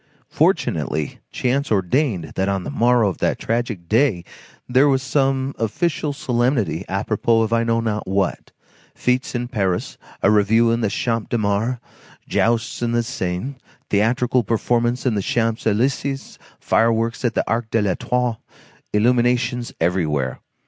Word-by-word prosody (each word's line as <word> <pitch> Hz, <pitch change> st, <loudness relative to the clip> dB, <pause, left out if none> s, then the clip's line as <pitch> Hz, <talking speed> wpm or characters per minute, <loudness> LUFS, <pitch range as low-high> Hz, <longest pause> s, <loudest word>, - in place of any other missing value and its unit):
Fortunately, 75 Hz, -1 st, 0 dB
chance 135 Hz, +2 st, -1 dB
ordained 100 Hz, -, 0 dB
that 95 Hz, +1 st, 0 dB
on 100 Hz, -2 st, -1 dB
the -, -, -5 dB
morrow 120 Hz, -4 st, +3 dB
of 95 Hz, -, -3 dB
that -, -, +1 dB
tragic 115 Hz, -7 st, -2 dB
day, 110 Hz, -5 st, +2 dB, 0.4 s
there 130 Hz, +3 st, +4 dB
was 135 Hz, -2 st, +2 dB
some 135 Hz, 0 st, 0 dB
official 150 Hz, -, -1 dB
solemnity 120 Hz, -, 0 dB
apropos 110 Hz, +3 st, +1 dB
of 110 Hz, +1 st, -1 dB
I 115 Hz, 0 st, +3 dB
know 115 Hz, 0 st, +1 dB
not 110 Hz, -2 st, -2 dB
what,—fêtes 100 Hz, +6 st, -3 dB
in 120 Hz, 0 st, -2 dB
Paris, 95 Hz, -7 st, -2 dB, 0.2 s
a 100 Hz, -, +5 dB
review 110 Hz, +3 st, +4 dB
in 115 Hz, +1 st, 0 dB
the 110 Hz, -, +1 dB
Champ 115 Hz, +2 st, -2 dB
de 120 Hz, -, 0 dB
Mars, 110 Hz, +4 st, 0 dB, 0.5 s
jousts 115 Hz, +2 st, 0 dB
on 120 Hz, -1 st, 0 dB
the 120 Hz, 0 st, +2 dB
Seine, 120 Hz, +1 st, -3 dB, 0.3 s
theatrical 120 Hz, +4 st, +2 dB
performances 120 Hz, +3 st, 0 dB
in 125 Hz, -, +2 dB
the 100 Hz, -, 0 dB
Champs 115 Hz, +2 st, -1 dB
Élysées, 135 Hz, +5 st, -1 dB, 0.2 s
fireworks 115 Hz, +1 st, +1 dB
at 120 Hz, -3 st, 0 dB
the -, -, 0 dB
Arc 115 Hz, 0 st, -1 dB
de 115 Hz, -2 st, +1 dB
l'Étoile, 120 Hz, +4 st, -1 dB, 0.5 s
illuminations 120 Hz, +2 st, +1 dB
everywhere. 75 Hz, -7 st, 0 dB
115 Hz, 140 wpm, -21 LUFS, 105-125 Hz, 0.5 s, a